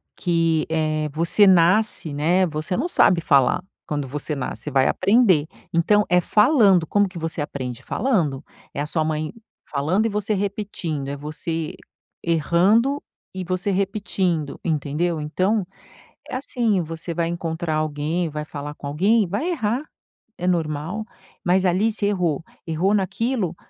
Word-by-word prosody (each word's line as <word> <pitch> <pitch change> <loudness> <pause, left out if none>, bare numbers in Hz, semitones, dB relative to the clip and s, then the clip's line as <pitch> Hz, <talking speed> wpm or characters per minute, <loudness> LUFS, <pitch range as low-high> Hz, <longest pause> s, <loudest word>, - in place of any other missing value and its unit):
que, 165 -3 +1
eh, 155 -1 0
você 170 +6 +3
nasce, 180 -2 +3
né, 175 +6 +2
você 155 +2 -3
não 310 +8 0
sabe 185 - +4
falar, 140 +2 +3 0.2
quando 145 -2 -2
você 150 +3 -4
nasce, 130 - -5
você 150 - -3
vai 135 -1 +3
aprender, 190 -7 +3 0.3
então 205 +5 +3
é 180 0 +4
falando, 210 - +4
como 205 +4 +2
que 180 - -10
você 165 -2 -3
aprende? 130 -4 -5
Falando. 165 - 0 0.3
É - - -3
a - - -1
sua 155 +1 0
mãe 155 0 -2 0.4
falando 160 +10 +1
e - - +2
você 210 +1 -1
repetindo, 190 -8 -3
é 140 - -3
você 155 +2 -4 0.5
errando 185 - +2 0.3
e 185 -1 -4
você 185 +3 -1
repetindo, 190 -6 -1
entendeu? 160 +1 -1
Então 185 +7 0 0.6
é - - -5
assim, 235 -7 0
você 165 +1 -6
vai 170 0 0
encontrar 170 -1 -3
alguém 155 +2 -1
vai 150 0 -4
falar 145 -1 -6
com 145 - -10
alguém, 195 +9 +2
vai 215 - -1
errar. 245 -6 -1 0.6
É 180 - -4
normal. 165 +4 -1 0.4
Mas 185 +1 +3
ali 190 +5 +2
você 210 -1 0
errou. 175 -7 0 0.2
Errou 170 +5 +1
naquilo, 205 -1 0
170 Hz, 150 wpm, -22 LUFS, 155-200 Hz, 0.6 s, sabe